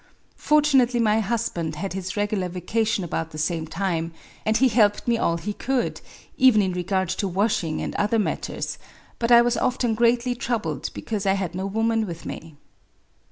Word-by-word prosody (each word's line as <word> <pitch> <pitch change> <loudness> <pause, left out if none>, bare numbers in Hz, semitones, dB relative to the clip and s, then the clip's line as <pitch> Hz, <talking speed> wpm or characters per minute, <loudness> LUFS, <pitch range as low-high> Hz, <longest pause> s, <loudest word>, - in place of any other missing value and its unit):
Fortunately 275 -5 +3
my 220 -1 +3
husband 205 -8 -2
had 190 +5 -4
his 190 +1 -5
regular 205 -3 -1
vacation 200 +4 -1
about 165 -1 -3
the 155 - -10
same 160 +1 -1
time; 165 -2 -2 0.3
and 220 +1 +3
he 260 +3 +4
helped 215 -3 +2
me 235 - +3
all 170 -7 +1
he 205 +5 -4
could, 260 +3 -2 0.2
— - - -27
even 255 -5 +6
in 190 - 0
re 180 - -2
gard 190 +1 0
to 195 +2 -1
washing 185 -4 0
and - - -4
other 210 +2 +1
matters; 215 - -3 0.4
but 235 0 0
I 235 0 +8
was 240 0 +1
often 245 -2 0
greatly 235 +2 +2
troubled 220 - -3
because 210 -3 -3
I 195 - +4
had 190 -3 -2
no 190 +2 -3
woman 225 +1 0
with 170 -2 -7
me. 160 -2 -8
205 Hz, 185 wpm, -24 LUFS, 180-235 Hz, 0.4 s, I